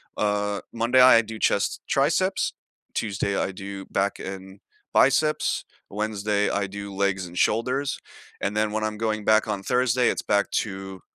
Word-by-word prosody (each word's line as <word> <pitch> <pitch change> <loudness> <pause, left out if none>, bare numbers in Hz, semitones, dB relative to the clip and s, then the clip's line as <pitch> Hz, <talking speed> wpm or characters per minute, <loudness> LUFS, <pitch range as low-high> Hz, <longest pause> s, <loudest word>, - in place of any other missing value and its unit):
uh, 105 -1 0
Monday, 120 +3 +3
I 125 -2 +8
do 110 0 -8
chest, 100 - +1
triceps. 165 +7 +1 0.4
Tuesday, 100 -2 -1
I - - -1
do 95 +1 -7
back 100 +1 -1
and 95 0 -8 0.3
biceps. 150 +3 +2 0.2
Wednesday, 105 0 -1
I 100 -1 -1
do 100 +1 -7
legs 100 -1 0
and 85 +1 -11
shoulders, 130 +7 0 0.4
and 105 - -1
then 105 0 +1
when 110 0 -2
I'm 105 -1 -3
going 110 -1 -2
back 110 +1 +4
on 100 -2 -2
Thursday, 125 +2 +2
it's - - -1
back 100 0 +1
to 95 -2 -3
105 Hz, 155 wpm, -25 LUFS, 100-115 Hz, 0.4 s, I